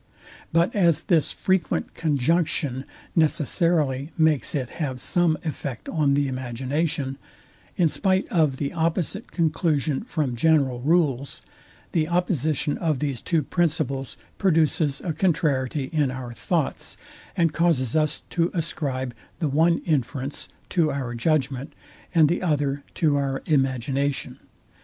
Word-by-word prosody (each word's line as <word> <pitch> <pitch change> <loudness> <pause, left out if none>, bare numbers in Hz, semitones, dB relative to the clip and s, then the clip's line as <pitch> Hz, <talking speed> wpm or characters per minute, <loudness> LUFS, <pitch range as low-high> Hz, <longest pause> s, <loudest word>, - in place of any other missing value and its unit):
But 170 +8 +2
as 170 -6 +3
this 165 -5 +2
frequent 185 -5 0
conjunction 145 -2 0 0.3
necessity 155 -2 +2
makes 160 -4 +2
it 130 -4 -2
have 130 -4 -2
some 170 +3 +2
effect 140 -5 -4
on 145 -4 +2
the 140 0 +2
imagination, 130 +3 -2 0.6
in 175 - +4
spite 190 +4 +1
of 155 -6 +2
the 140 0 -3
opposite 170 +5 -1
conclusion 155 -4 +1
from 150 - -2
general 140 -2 +3
rules, 140 -2 +1 0.5
the 155 -2 +1
opposition 160 -4 +1
of 160 -5 +1
these 140 -3 -2
two 165 -4 +1
principles 145 -4 -1 0.2
produces 160 -5 +2
a 170 - -2
contrariety 150 -5 +1
in 150 -4 +2
our 130 -2 -6
thoughts, 150 - -2 0.4
and 165 -3 +2
causes 160 -8 +1
us 155 -1 +1
to 170 0 +1
ascribe 135 -6 -2 0.2
the 160 -5 -1
one 165 +4 +3
inference 140 -2 -2 0.2
to 165 -4 +2
our 130 -4 -3
judgment, 140 +1 0 0.4
and 160 -2 +6
the 170 +4 0
other 145 -5 0
to 150 -3 +2
our 135 -1 -1
imagination. 135 -1 0
150 Hz, 125 wpm, -24 LUFS, 135-165 Hz, 0.6 s, and